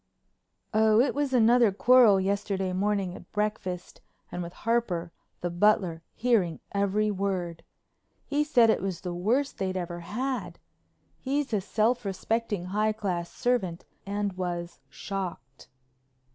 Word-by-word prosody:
"Oh, 215 0 +4
it 255 - +3
was 290 -2 -1
another 240 -2 +5
quarrel 225 -1 +6
yesterday 195 -1 -1
morning 195 -1 0
at 175 - -12
breakfast 205 -4 -3 0.3
and 180 - -4
with 170 0 -5
Harper, 185 -7 -1 0.3
the 175 - -2
butler, 175 -3 +2
hearing 215 -9 +1
every 200 +1 +1
word. 185 -4 -2 0.6
He 290 +1 +1
said 245 -7 +5
it - - 0
was 185 -3 -3
the 180 -1 -4
worst 235 +11 0
they'd 190 -1 -1
ever 175 -1 -4
had. 210 -1 -3 0.6
He's 275 -1 -2
a 205 - +2
self 220 +5 +1
respecting, 205 0 -2
high 210 +3 +1
class 185 -5 -3
servant 195 -9 -1 0.2
and 200 0 -2
was 175 -2 -4
shocked." 180 - -6
200 Hz, 130 wpm, -28 LUFS, 180-225 Hz, 0.6 s, quarrel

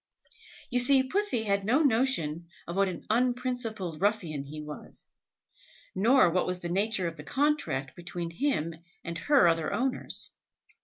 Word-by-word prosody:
You 245 - +2
see 260 +2 +5
Pussy 375 - 0
had 200 -2 0
no 255 +10 +3
notion 225 - +2 0.2
of 170 - -6
what 195 0 +2
an 180 - -7
un 245 +2 +3
principled 225 -10 -3
ruffian 180 -9 0
he 150 +2 -8
was, 150 0 -6 0.9
nor 220 -1 +4
what 185 - +1
was 180 0 -1
the 175 - -4
nature 195 0 +1
of 165 0 -6
the - - -8
contract 270 - 0
between 175 -1 -5
him 170 - -1 0.3
and 170 -1 -5
her 280 - +4
other 165 -2 +1
owners. 255 +5 -1
200 Hz, 155 wpm, -29 LUFS, 170-255 Hz, 0.9 s, see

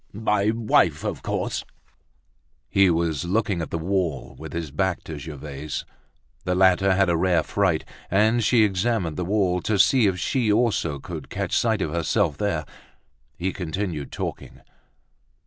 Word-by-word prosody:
"My 105 -1 +1
wife, 110 -1 +2
of - - -3
course!" - - -2 1.1
He 95 -1 +5
was 80 -3 0
looking 95 0 0
at 80 - -4
the - - -2
wall, 85 -4 -2
with - - -8
his 85 -4 -4
back 95 +4 -1
to 80 -2 -7
Gervaise. 75 -1 -6 0.6
The 90 - 0
latter 95 +1 +4
had 95 0 +3
a 85 - +2
rare 85 -1 +2
fright, 95 -6 0 0.2
and 110 +5 +3
she 115 0 +4
examined 95 -4 0
the 90 - -2
wall, 90 -1 +1
to 105 +2 0
see 120 +3 +5
if 95 -2 0
she 110 +4 +1
also 105 -9 +1
could - - -8
catch - - -2
sight 110 -4 +2
of 75 - -3
herself 85 -1 0
there. 90 -7 -1 0.7
He 95 +2 -2
continued 90 -4 -4
talking. - - -6
95 Hz, 155 wpm, -24 LUFS, 80-105 Hz, 1.1 s, He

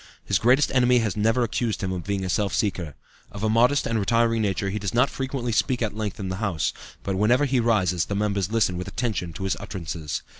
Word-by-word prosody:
His 100 -3 +1
greatest 125 +7 +3
enemy 125 -1 +4
has 110 -5 0
never 115 +4 +2
accused 115 -2 -2
him 95 - -1
of 90 -2 -4
being 100 -1 -2
a - - -3
self 100 0 0
seeker. 90 - -1 0.4
Of 100 +1 -7
a 110 - +2
modest 125 +5 +3
and 115 -1 0
retiring 115 +2 +2
nature, 100 -1 -1
he 105 - -2
does 100 +2 -3
not 125 +3 +3
frequently 130 -2 -3
speak 125 +2 +1
at 105 -2 -2
length 105 -2 -4
in 95 - -3
the 95 - -3
House, 100 -7 -1 0.3
but 95 -1 -2
whenever 120 +8 +3
he 130 -2 +1
rises 95 -7 +2
the 100 - -3
members 100 -1 -1
listen 110 -6 +1
with 90 - -5
attention 105 -8 -2
to 95 - -7
his 95 - 0
utterances. 85 -5 -5
105 Hz, 230 wpm, -24 LUFS, 95-120 Hz, 0.4 s, enemy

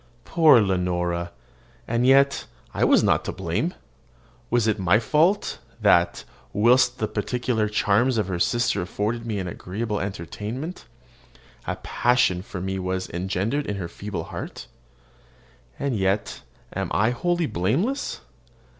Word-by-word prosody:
Poor 155 -7 +6
Leonora! 90 -3 0 0.6
and 120 +2 +1
yet 140 +1 +4 0.3
I - - 0
was - - +5
not - - +3
to - - -2
blame. - - -2 0.7
Was 120 -2 +2
it 110 -1 +1
my 95 +2 +4
fault, 155 - +1 0.2
that, 90 -5 +3 0.3
whilst 120 +4 +4
the 110 - -1
peculiar 110 +1 -1
charms 110 +4 +2
of 105 -4 0
her 90 -2 -3
sister 120 +4 +1
afforded 110 +6 -3
me 110 -2 -2
an 95 -2 -3
agreeable 105 +5 -4
entertainment, 105 - -5 0.8
a - - -1
passion 120 -7 +1
for 95 -1 -7
me 95 +1 -3
was 95 0 -3
engendered 95 - -1
in 105 - -2
her 95 -3 -4
feeble 100 +3 -5
heart? - - -7 1.1
And 140 -3 -1
yet 95 +1 -1 0.3
am - - -2
I 110 +3 +3
wholly 175 +7 0
blameless? 135 - -1
105 Hz, 135 wpm, -24 LUFS, 95-125 Hz, 1.1 s, Poor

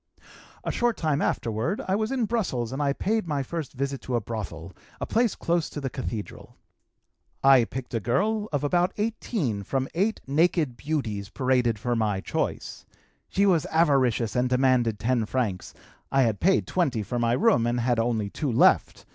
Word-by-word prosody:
"A - - -1
short 240 -1 0
time 155 -3 0
afterward 115 - -1
I 190 - +2
was 215 +3 -1
in 255 -4 +1
Brussels 185 - -1
and 135 - -3
I 140 -1 +2
paid 210 +6 -1
my 145 -3 -1
first 160 +1 -5
visit 140 +1 -3
to 125 - -3
a - - +2
brothel, 95 -6 -6 0.3
a - - -2
place 230 -2 +1
close 170 -1 0
to - - -6
the 135 -3 -4
Cathedral. 115 -5 -6 0.9
I 135 -3 +7
picked 130 +1 -7
a 115 - +1
girl 205 - 0
of 145 -2 -1
about 175 +5 +2
18 210 - -2
from 130 +6 -2
eight 200 +7 0
naked 150 -2 +1
beauties 115 -9 -3
paraded 125 -4 +1
for 120 +3 -1
my 105 -4 0
choice. - - -3 0.5
She 200 - +2
was 175 -6 +3
avaricious 130 -9 +2
and 125 0 +1
demanded 125 -4 +2
10 115 0 0
francs, 105 -9 -2 0.4
I 135 -1 +4
had 110 -4 0
paid 190 +2 +3
20 135 - 0
for 120 +4 -3
my 120 0 +2
room 190 - +3
and 120 +1 0
had 120 0 +1
only 115 -3 0
2 145 -5 -2
left. 115 - +3
130 Hz, 180 wpm, -26 LUFS, 115-170 Hz, 0.9 s, I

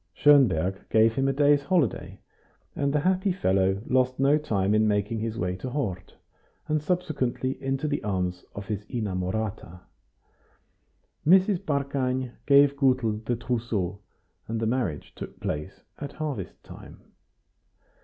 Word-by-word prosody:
Schonberg 100 - +3
gave 110 0 +4
him 135 +2 0
a - - +3
day's 145 +1 +4
holiday, 150 - 0 0.6
and 140 -1 0
the 150 0 +1
happy 185 +3 +1
fellow 95 - +1
lost 130 0 +1
no 140 +2 +4
time 100 -9 0
in 110 0 +3
making 105 +2 0
his 115 0 -3
way 90 +1 -1
to 130 - -5
Hort, 115 -10 -4 0.5
and 155 0 0
subsequently 140 -6 -2
into 135 +2 -1
the 145 -1 -2
arms 90 -3 -2
of 100 - -6
his 105 -1 -4
inamorata. 95 -3 -3 1.4
Mrs. 185 +3 +5
Barkany 135 -3 -1 0.2
gave 140 0 +6
Gutel 125 -6 +1
the 120 +2 -1
trousseau, 115 -6 -2 0.5
and 115 0 -2
the 115 - -1
marriage 110 - -2
took - - -9
place 75 +5 -5 0.2
at 145 -1 -6
harvest 145 - -5
time. - - -13
125 Hz, 135 wpm, -26 LUFS, 100-140 Hz, 1.4 s, gave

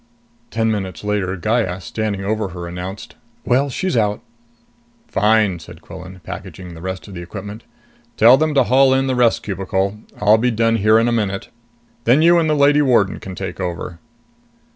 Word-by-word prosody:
Ten 110 0 0
minutes 95 -3 -4
later, 100 -3 -1
Gaya, 105 -1 -1
standing 100 0 -3
over 110 0 -1
her, 90 -1 -7
announced, 95 +6 -7 0.3
"Well, 135 +3 +2
she's 185 +6 -2
out." 105 -2 0 0.8
"Fine," 105 -4 +2
said - - -13
Quillan, 95 0 -11
packaging 90 -2 -8
the 80 - -11
rest 95 +2 -5
of 100 - -10
the 85 - -7
equipment. 100 +5 -8 0.5
"Tell 115 +4 +8
them 155 +2 0
to 135 - +5
haul 130 +2 +4
in 135 0 +1
the 130 - 0
rest 120 -2 +2
cubicle. 95 +1 -2 0.2
I'll 105 +1 +4
be 125 +2 +2
done 115 0 +1
here 110 +1 +4
in 115 +1 +3
a - - +1
minute. 100 -4 -2 0.6
Then 130 +7 +4
you 170 +1 +6
and 160 -2 +1
the 155 - +2
lady 145 +1 +4
warden 120 -9 +2
can 95 -1 -8
take 95 +1 -6
over." 90 -2 -5
105 Hz, 180 wpm, -19 LUFS, 95-120 Hz, 0.8 s, Tell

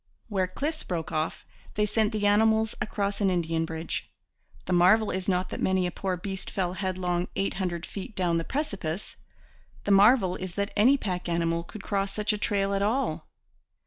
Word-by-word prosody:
Where 190 -3 +1
cliffs 300 - -3
broke 170 -3 -4
off, 155 0 -2 0.3
they 210 - +2
sent 215 +1 +1
the 210 -2 -1
animals 220 +1 +4
across 200 -1 -1
an 195 - +4
Indian 165 -2 0
bridge. 160 0 -4 0.6
The 185 - -1
marvel 190 +5 +5
is 185 +1 -2
not 185 0 +1
that - - -5
many 190 -1 +2
a 180 - -1
poor 185 0 -2
beast 190 +1 -5
fell 180 -2 -1
headlong 185 -2 -1
eight 195 - 0
hundred 175 -3 -2
feet 200 +2 -7
down 175 -3 +1
the - - -2
precipice. 200 - -3 0.7
The 205 - 0
marvel 200 -1 +6
is 185 -1 -6
that 200 0 -2
any 250 +7 +5
pack 180 -7 -3
animal 170 0 0
could 200 +4 -10
cross 195 -1 -1
such 210 0 0
a 210 - -3
trail 200 -1 0
at 195 - 0
all. 230 +7 0
195 Hz, 185 wpm, -27 LUFS, 180-210 Hz, 0.7 s, marvel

